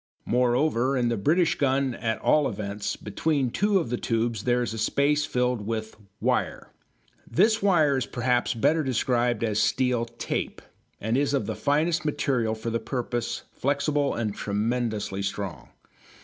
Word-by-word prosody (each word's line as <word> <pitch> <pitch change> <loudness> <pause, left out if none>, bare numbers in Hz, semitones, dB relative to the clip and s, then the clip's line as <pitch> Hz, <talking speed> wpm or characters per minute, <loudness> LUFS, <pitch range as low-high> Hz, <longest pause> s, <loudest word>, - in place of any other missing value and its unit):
Moreover, 125 +2 +2
in 120 -1 +1
the 120 - 0
British 160 - +2
gun 135 -1 +1
at 115 -2 -2
all 150 -2 +3
events, 100 -1 -4
between 130 +4 -1
two 205 - +2
of 145 -11 -1
the 125 - 0
tubes 115 0 -1
there 125 0 +2
is 120 - -3
a 110 - -5
space 145 +5 +2
filled 125 -5 0
with 110 -1 -3 0.2
"wire." - - -1 0.6
This 220 - +3
wire 160 -8 +3
is 130 - -2
perhaps 125 0 0
better 155 +8 +2
described 125 -2 0
as 110 -2 0
steel 125 -3 +1
tape, 120 0 -4 0.4
and 110 +3 -1
is 140 +1 +2
of 135 - 0
the - - -3
finest 160 +4 +1
material 130 -7 0
for 110 +1 -4
the 115 - 0
purpose, 120 0 -3
flexible 145 +1 0
and 110 -3 -2
tremendously 105 -1 -2
strong. 100 -10 -4
125 Hz, 155 wpm, -26 LUFS, 115-140 Hz, 0.6 s, all